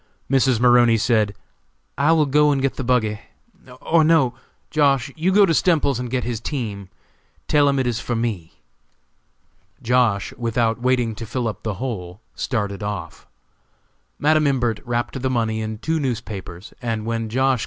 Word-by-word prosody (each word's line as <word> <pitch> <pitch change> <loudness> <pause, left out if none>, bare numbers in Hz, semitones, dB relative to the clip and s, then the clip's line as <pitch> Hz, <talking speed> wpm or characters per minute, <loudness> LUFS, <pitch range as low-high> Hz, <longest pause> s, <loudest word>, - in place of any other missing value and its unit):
Mrs. 130 -3 +3
Maroney 120 -1 +5
said: 110 -3 +1 0.6
"I 145 +4 +2
will 160 -2 +4
go 150 +2 +3
and 140 -2 +1
get 135 0 0
the 135 - -5
buggy, 115 -4 +1 0.6
or 165 -1 +3
no! 155 -6 +3 0.4
Josh.! 140 -4 +2
you 170 +4 +1
go 200 +1 +6
to 165 - +1
Stemples's 150 -7 +2
and 125 -1 -4
get 125 0 -1
his 115 -2 -3
team; 110 -7 -5 0.6
tell 145 -1 +4
him 140 - +1
it 130 - +1
is 120 -2 -1
for 120 - -3
me." 110 -8 -3 1.3
Josh., 115 -5 +1
without 115 0 0
waiting 125 -2 +1
to 110 +2 -7
fill 125 +1 -2
up 110 - -5
the 110 -3 -3
hole, 95 -6 -5
started 105 -5 -3
off. 105 -5 -6 0.9
Madam 155 0 +3
Imbert 120 -5 0
wrapped 120 +2 -2
the 130 - 0
money 110 -3 -1
in 110 0 -4
two 160 +8 -1
newspapers, 110 - -5
and 115 -3 -3
when 115 -1 -2
Josh. 130 +2 +1
120 Hz, 165 wpm, -21 LUFS, 110-135 Hz, 1.3 s, go